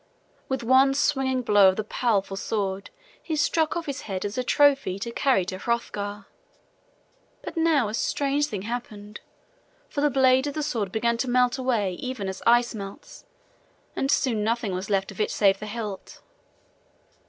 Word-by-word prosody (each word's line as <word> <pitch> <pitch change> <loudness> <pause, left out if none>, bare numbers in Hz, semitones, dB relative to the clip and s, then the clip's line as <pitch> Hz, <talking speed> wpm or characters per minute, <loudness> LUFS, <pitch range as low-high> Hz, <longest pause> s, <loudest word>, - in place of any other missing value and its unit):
With 265 -2 -2
one 265 +3 +4
swinging 265 -3 +1
blow 205 -4 +6
of 190 - 0
the 215 - -2
powerful 210 -3 -1
sword 195 -1 -3 0.3
he 320 - -3
struck 315 +2 +1
off 335 - -4
his 280 -1 -4
head 190 -2 -4
as 205 +1 -4
a 255 - -1
trophy 275 -7 +3
to 235 +4 -5
carry 240 -6 +2
to 185 0 -5
Hrothgar. 205 -3 -3 1.2
But - - -7
now 320 -7 +2
a 210 - -5
strange 285 +4 0
thing 200 -8 -5
happened, 210 -3 -6 0.7
for 285 - -3
the 295 - +3
blade 260 0 +3
of 285 - -4
the 305 - -2
sword 225 -9 -2
began 235 +2 0
to 255 +2 -2
melt 250 +1 +2
away 230 -7 0
even 255 -6 -4
as 190 0 -5
ice 240 +1 +4
melts, 200 -2 -9 0.7
and 270 - -1
soon 245 -6 +1
nothing 225 -2 -1
was 185 +2 -4
left 195 -1 0
of 195 - -5
it - - +1
save 195 -2 +2
the 215 - -7
hilt. 210 -3 -7
235 Hz, 175 wpm, -25 LUFS, 205-265 Hz, 1.2 s, blow